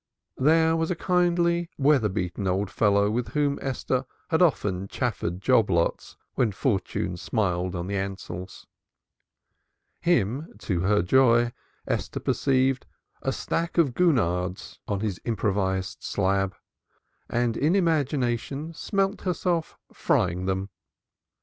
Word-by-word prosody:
There 160 +4 +4
was 165 0 0
a 180 - 0
kindly, 175 -1 +1
weather 135 -6 +3
beaten 95 0 -3
old 95 +2 0
fellow 100 -1 +3
with 120 +2 -2
whom 145 -1 +1
Esther 130 -1 -1 0.2
had 160 - +2
often 100 - +1
chaffered 100 -7 -2
job 115 -5 +4
lots 85 -2 0 0.2
when 110 -5 +1
fortune 95 -5 -1
smiled 90 -2 -1
on 85 -1 -3
the 100 - -4
Ansells. 95 -2 -6 1.3
Him, 140 - 0
to 95 -4 -2
her 100 +1 +2
joy, 120 +2 +4 0.3
Esther - - -2
perceived 130 -1 +1
she - - -42
saw - - +2
a - - +2
stack 170 +1 -2
of 150 -7 +3
gurnards 90 - 0
on 100 -1 -1
his 105 -4 -3
improvised 95 -4 -1
slab, 95 -1 0 0.7
and 120 -1 0
in 155 +6 +2
imagination 145 - 0
smelt 195 +3 -1
herself 175 -2 -1 0.2
frying 90 +2 +1
them. 95 +1 -1
120 Hz, 125 wpm, -26 LUFS, 95-155 Hz, 1.3 s, There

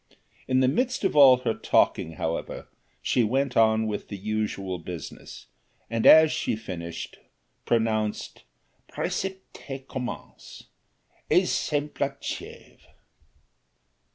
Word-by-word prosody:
In 130 0 +2
the 130 - +4
midst 250 - 0
of 195 - +1
all 135 -3 +8
her 115 - 0
talking, 80 - +1
however, 80 +1 -4 0.4
she 125 - +2
went 130 +4 0
on 110 0 +4
with 105 -1 -4
the 100 - -6
essential 100 -3 -3
business, 85 -2 -9 0.5
and 115 -1 +2
as 160 0 +8
she - - -1
finished, 90 -6 -7 0.5
pronounced 110 -2 -1 0.5
"Précepte 170 -8 -5
commence, 125 -2 -7 0.7
exemple 145 -1 +1
achève." - - -8
115 Hz, 100 wpm, -26 LUFS, 105-140 Hz, 0.7 s, all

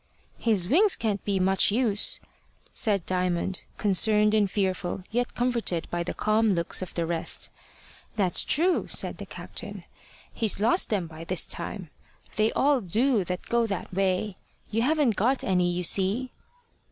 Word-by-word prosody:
"His 210 -7 +2
wings 375 - +5
can't 205 -4 -2
be 200 -2 -1
much 190 +1 +3
use," 210 -2 +1 0.5
said 200 -5 +2
Diamond, 180 0 -1
concerned 210 +1 +3
and 210 -2 +2
fearful, 185 -2 -2
yet 245 +2 -2
comforted 235 -9 -1
by 175 - -2
the 170 - -4
calm 215 0 +2
looks 170 +1 +1
of 185 - -7
the 170 - -1
rest. 165 0 -2 0.6
"That's 190 -5 +2
true," 350 +5 +1
said - - 0
the - - -9
captain. - - -6 0.5
"He's 220 -4 +2
lost 230 - +2
them 200 -5 -1
by 160 0 -10
this 180 0 +1
time. 185 -8 -5 0.4
They 215 +1 +2
all 280 -2 +2
do 220 +4 +1
that 180 +1 -4
go 235 -1 +1
that 195 -2 -5
way. 190 +1 -1 0.3
You 225 +1 0
haven't 280 -4 +1
got 255 +6 +1
any, 180 -2 +1
you 180 +1 -3
see." 200 +8 +1
205 Hz, 155 wpm, -26 LUFS, 185-230 Hz, 0.6 s, wings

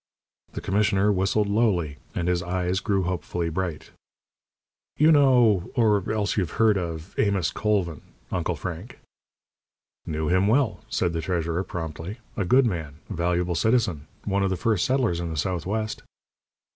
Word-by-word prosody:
The - - -5
commissioner 105 0 +2
whistled 100 +2 +1
lowly, 100 -9 +1 0.2
and 85 - -1
his 90 -1 +1
eyes 90 +1 -1
grew 100 -3 0
hopefully 85 -1 -2
bright. 85 -2 -4 1.1
"You 155 +2 +6
know, 125 - +4
or 105 -5 +2
else 105 -2 0
you've 90 -6 -1
heard 110 -2 +4
of, 85 -1 -4
Amos 100 -4 +2
Colvin, 95 -7 -1 0.3
Uncle 85 -1 -1
Frank?" 90 - -7 1.1
"Knew 80 0 -2
him 95 +3 +3
well," 125 +1 +2
said 85 - 0
the 80 - -2
treasurer, 85 +1 -1
promptly. 80 +3 -6 0.2
"A 100 - -1
good 130 +7 +5
man. 80 - -3 0.2
A - - -2
valuable 90 +1 0
citizen. 90 -6 +1 0.2
One 100 -1 0
of 95 - +2
the 95 - -1
first 105 -1 +1
settlers 125 -10 +1
in 85 -1 -3
the 80 - -5
Southwest." 95 +7 -2
95 Hz, 150 wpm, -25 LUFS, 85-105 Hz, 1.1 s, You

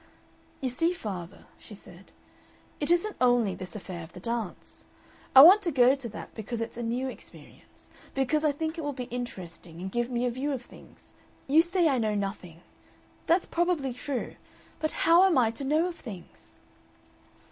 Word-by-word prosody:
"You 260 - -1
see, 330 +8 +1
father," 190 - -7
she 210 - -12
said, 185 -1 -15 0.7
"it 295 - -2
isn't 350 +5 +2
only 245 -5 +3
this 185 +1 -7
affair 185 -4 -7
of 160 - -13
the - - -9
dance. 230 -1 -5 0.5
I 265 - +12
want 375 +8 +9
to 350 -4 -1
go 255 -2 +5
to 270 -4 -4
that 215 - -9
because 225 +1 -5
it's 230 - -4
a 240 - -5
new 240 +3 -2
experience, 260 - -12 0.2
because 275 +3 +1
I 305 - +3
think 315 +3 -4
it - - -2
will 290 -1 -3
be 255 -1 -5
interesting 180 -8 -7
and 190 +1 -5
give 240 +2 -1
me 245 0 -1
a 245 - 0
view 275 +4 -2
of 255 -2 -5
things. - - -17 0.3
You 300 +4 +5
say 345 0 +2
I 270 -4 +2
know 215 -2 0
nothing. 195 -5 -5 0.7
That's 345 +2 +3
probably 335 -7 0
true. 255 +1 -5 0.4
But 310 - -2
how 335 +2 +7
am 380 -5 +4
I 230 -3 +3
to 230 - -8
know 305 +5 +2
of 345 - -9
things?" 200 -8 -11
250 Hz, 185 wpm, -28 LUFS, 215-310 Hz, 0.7 s, I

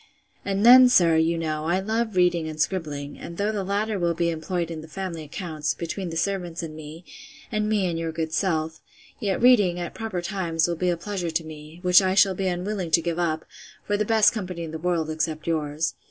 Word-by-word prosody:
And 200 +2 0
then, 250 +1 +9
sir, 170 -9 +5
you 165 +1 +2
know, 155 -1 -2
I 175 +3 +1
love 220 +1 -2
reading 175 -3 +2
and 155 0 -8
scribbling; 150 -4 -2
and 170 - -8
though 200 - 0
all - - -7
the 200 -2 -2
latter 205 +2 -1
will 170 -1 0
be 170 0 +1
employed 170 +1 -3
in 160 -1 -6
the 160 - -11
family 170 0 -5
accounts, 155 0 -4
between 175 +2 -4
the 165 - -5
servants 175 -2 -2
and 155 -2 -7
me, 155 +3 -10 0.5
and 215 -1 0
me 210 -3 +1
and 170 -2 -2
your 165 -1 -2
good 160 0 -4
self: 160 -4 -1 0.4
yet 195 -3 -1
reading, 205 -8 +4
at 175 - -5
proper 220 -6 -4
times, 175 -4 0
will 170 - -1
be 180 +2 0
a 175 - 0
pleasure 180 -1 -4
to 165 +1 -1
me, 155 +1 -11
which 180 +1 +6
I 190 0 +1
shall 195 -1 +5
be 190 +1 -2
unwilling 185 0 -2
to 165 +1 +4
give 170 0 -2
up, 160 -2 -1 0.4
for 205 - 0
the 210 - +1
best 220 0 +4
company 180 -6 -5
in 160 - -6
the 160 - -6
world, 170 -2 0
except 155 0 -2
yours. 155 -1 -1
175 Hz, 225 wpm, -24 LUFS, 160-195 Hz, 0.5 s, then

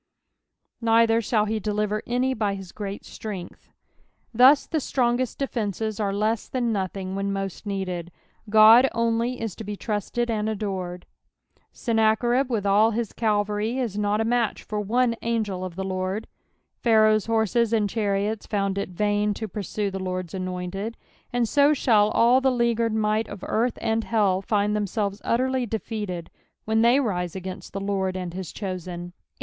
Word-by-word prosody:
*' - - -55
A'rither 230 0 +4
thall 215 -3 +3
he 215 +1 -1
deHrer 210 +1 -1
any 250 +2 +1
fty 205 -4 -1
Aw 190 -2 -10
great 200 -1 -6
tlrengtK," 195 -5 -7 0.8
Thus 260 +5 +6
the 315 - -1
strongest 250 -2 0
defences 220 -5 -2
aie 205 -2 0
lessthan 225 +4 -1
nothing 190 -2 -3
when 195 0 -2
most 195 +1 -4
needed. 185 -3 -3 0.4
God 220 +5 +8
only 230 +2 0
is 225 -5 -4
to - - -6
bo 210 0 -5
trusted 225 +3 -2
and 215 -1 -1
adored, 190 -4 -4 0.7
^ennacherib 235 +3 +2
with 220 -5 -1
all 205 +3 +5
his 230 -1 -3
cavalry 210 +1 0
is 240 -6 -2
not 210 0 0
a 225 - +1
match 235 -1 0
for 210 -1 -3
one 235 +3 +1
angel 215 -5 -1
of 185 -2 -6
the 190 - -3
Lord, 190 +3 -3 0.6
Phal'aoh's 215 -2 +4
horses 225 0 +2
and 215 -3 +2
chariots 205 0 -1
found 200 -1 -1
it 200 - -3
vain 205 +2 0
to 220 - -4
Sursue 205 0 -3
the 195 - -4
Lord's 185 -2 -4
anointed, 185 +3 -4 0.3
and 245 -1 +1
so 285 +4 +4
shall 215 -6 +4
all 240 +4 +4
the 265 - +3
leaguered 235 -2 +1
might 215 0 +1
of 200 -2 -9
earlli 235 +2 0
and 225 0 0
hell 200 -4 +1
nd 210 0 +2
themselves 205 0 -2
utterly 255 +1 0
defeated 205 -6 -4 0.3
when 220 +1 +2
they 240 +4 +5
rise 180 - -2
against 185 0 -7
the 195 - -3
L«rd 190 -2 -1
and 180 -2 -5
his 180 -3 -6
chosen^ 185 -3 -5
18. - - -21
215 Hz, 165 wpm, -25 LUFS, 195-230 Hz, 0.8 s, God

